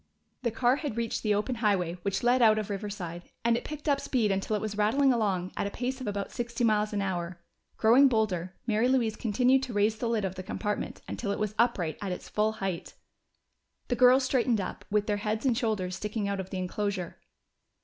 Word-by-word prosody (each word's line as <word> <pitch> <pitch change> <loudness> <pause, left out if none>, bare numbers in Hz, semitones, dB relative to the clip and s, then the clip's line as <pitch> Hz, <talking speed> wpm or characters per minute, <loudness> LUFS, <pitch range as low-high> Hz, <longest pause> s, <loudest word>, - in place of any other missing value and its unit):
The 240 - +1
car 240 +4 +2
had 290 -7 -4
reached 230 -1 -1
the 210 -2 +2
open 230 +4 -1
highway 195 -7 +1
which 195 +3 -2
led 245 +1 +4
out 215 -2 +6
of 215 -1 -3
Riverside, 195 -4 -5 0.2
and 235 0 +4
it 235 - -2
picked 300 0 -7
up 280 -1 +3
speed 225 -6 +1
until 195 +2 0
it - - 0
was 215 -1 -3
rattling 255 +6 +3
along 195 -6 0
at - - -1
a - - -2
pace 255 +5 -3
of 255 - -5
about 200 -1 -3
sixty 235 -1 -3
miles 215 -2 +2
an 205 -1 -1
hour. 175 -2 -3 0.4
Growing 245 +5 +6
bolder, 190 -7 0
Mary 225 +1 +2
Louise 240 -4 +2
continued 250 +4 +2
to 255 -3 -5
raise 210 +1 +2
the 235 - -1
lid 220 -3 0
of 185 - -2
the 185 - -6
compartment 210 +2 -4
until 215 - -4
it 200 - 0
was 215 -1 -2
upright 185 -10 +1
at 200 -2 -3
its 180 - -6
full 215 +1 +1
height. 195 -5 -4 0.9
The 245 - +1
girls 255 +2 +6
straightened 250 -3 +2
up, 190 - -5
with 210 0 +1
their 210 -1 0
heads 215 +3 -2
and 250 -3 +3
shoulders 210 -6 -1
sticking 210 +1 -3
out 200 -1 -2
of 190 0 -5
the 190 - -4
enclosure. 185 -1 -3
215 Hz, 220 wpm, -29 LUFS, 200-240 Hz, 0.9 s, out